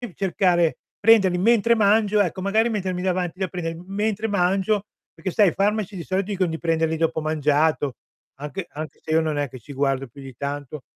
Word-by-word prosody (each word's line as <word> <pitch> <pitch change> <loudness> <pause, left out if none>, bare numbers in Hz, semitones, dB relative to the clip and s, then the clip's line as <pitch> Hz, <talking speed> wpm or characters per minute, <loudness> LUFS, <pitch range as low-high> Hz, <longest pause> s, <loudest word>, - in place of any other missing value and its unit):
cercare 180 -3 +1 0.2
prenderli 200 -5 +5
mentre 230 +4 +4
mangio, 210 0 +3
ecco, 185 0 -1
magari 215 +4 +2
mettermi 185 -5 -2
davanti 185 -1 -1
da 190 - 0
prender 165 -2 -4
mentre 210 +2 -1
mangio, 195 +1 +1 0.3
perché 185 - -5
sai, 205 -2 +4
i - - -6
farmaci 205 0 0
di 170 - -5
solito 190 0 -1
dicon 185 -3 0
di 160 0 -4
prenderli 160 -1 0
dopo 165 0 0
mangiato, 150 -2 +1 0.4
anche 165 +5 -6
anche 155 +1 -7
se 155 - -6
io 160 +1 +4
non 155 -2 -1
è 145 - 0
che 130 -1 -10
ci 145 - -13
guardo 135 0 0
più 140 +4 -14
di 135 -2 -10
tanto. 145 +1 -5
180 Hz, 190 wpm, -23 LUFS, 155-200 Hz, 0.4 s, prenderli